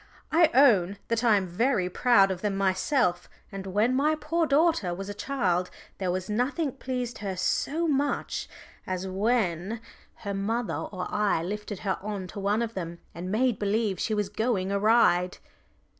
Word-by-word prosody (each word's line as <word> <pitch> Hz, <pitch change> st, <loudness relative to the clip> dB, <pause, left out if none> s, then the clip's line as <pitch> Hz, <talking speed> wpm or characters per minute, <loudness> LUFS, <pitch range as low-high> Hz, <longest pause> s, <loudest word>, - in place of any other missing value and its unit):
"I 330 Hz, 0 st, +5 dB
own 205 Hz, -9 st, +5 dB
that 230 Hz, +1 st, 0 dB
I 230 Hz, -3 st, +5 dB
am 195 Hz, -, -1 dB
very 190 Hz, +2 st, +1 dB
proud 195 Hz, 0 st, +4 dB
of 185 Hz, -1 st, -4 dB
them 205 Hz, -2 st, -1 dB
myself, 190 Hz, -, +1 dB, 0.2 s
and 195 Hz, -1 st, -6 dB
when 210 Hz, +6 st, +2 dB
my 295 Hz, +4 st, +2 dB
poor 320 Hz, +2 st, 0 dB
daughter 285 Hz, -, +2 dB
was 195 Hz, +2 st, -6 dB
a -, -, -4 dB
child 185 Hz, -8 st, -1 dB, 0.3 s
there 185 Hz, -2 st, -1 dB
was 185 Hz, +1 st, -2 dB
nothing 260 Hz, +8 st, 0 dB
pleased 250 Hz, -3 st, -4 dB
her 195 Hz, -2 st, -3 dB
so 310 Hz, -, 0 dB
much 285 Hz, -1 st, -1 dB, 0.4 s
as 185 Hz, 0 st, -3 dB
when 200 Hz, 0 st, 0 dB, 0.5 s
her 200 Hz, -, -2 dB
mother 220 Hz, +4 st, -1 dB, 0.2 s
or 185 Hz, -2 st, -4 dB
I 210 Hz, -6 st, +1 dB
lifted 205 Hz, +1 st, -5 dB
her 190 Hz, -2 st, -1 dB
on 200 Hz, -2 st, -4 dB
to 200 Hz, -, -7 dB
one 205 Hz, +3 st, +1 dB
of 230 Hz, -1 st, -4 dB
them, 170 Hz, -3 st, -5 dB, 0.2 s
and 180 Hz, +2 st, -5 dB
made 240 Hz, +1 st, +1 dB
believe 205 Hz, -2 st, 0 dB
she 215 Hz, -, 0 dB
was 210 Hz, -1 st, 0 dB
going 205 Hz, -3 st, -1 dB
a 200 Hz, -, +1 dB
ride." 195 Hz, -5 st, +3 dB
210 Hz, 175 wpm, -27 LUFS, 190-245 Hz, 0.5 s, I